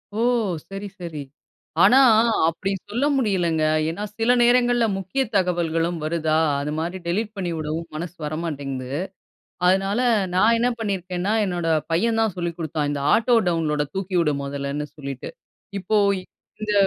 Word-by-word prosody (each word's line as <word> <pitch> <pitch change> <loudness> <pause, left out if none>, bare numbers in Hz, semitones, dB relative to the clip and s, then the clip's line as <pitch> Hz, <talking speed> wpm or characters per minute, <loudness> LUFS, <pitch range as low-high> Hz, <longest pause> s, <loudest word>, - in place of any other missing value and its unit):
ஓ! - - -3 0.5
சரி, 195 +1 -6
சரி. 165 -4 -6 0.6
ஆனா, 255 - +7 0.5
அப்படி 185 +4 -3 0.2
சொல்ல 240 +7 0
முடியலங்க. 180 -10 +1 0.3
ஏனா, 170 +6 -4 0.2
சில 235 +2 +4
நேரங்கள்ல 240 0 +4
முக்கிய 195 +8 -2
தகவல்களும் 170 -2 +1
வருதா? 155 0 0 0.2
அது 145 +1 -3
மாதிரி 175 +3 -3
டெலிட் 210 +5 -1
பண்ணிவிடவும் 165 -2 -3
மனசு 170 +2 -5
வரமாட்டேங்குது. 140 -4 -4 0.7
அதனால, 195 +4 +2 0.4
நான் 215 +5 +5
என்ன 245 +2 +2
பண்ணியிருக்கேன்னா, 190 -2 -2
என்னோட 175 -3 -2 0.3
பையன் 225 +6 +2
தான் 220 -5 0
சொல்லிக் 170 -2 -3
குடுத்தான். 155 -3 -2
இந்த 145 -1 -3
ஆட்டோ 235 +2 +3
டவுன்லோட 155 -3 0
தூக்கி 190 -1 -1
விடு 155 -3 +2
மொதல்லன்னு 140 +1 -4
சொல்லிட்டு, 140 -3 -6 0.5
இப்போ 215 +3 0 0.6
இந்த 210 -1 -1
175 Hz, 130 wpm, -23 LUFS, 155-205 Hz, 0.7 s, ஆனா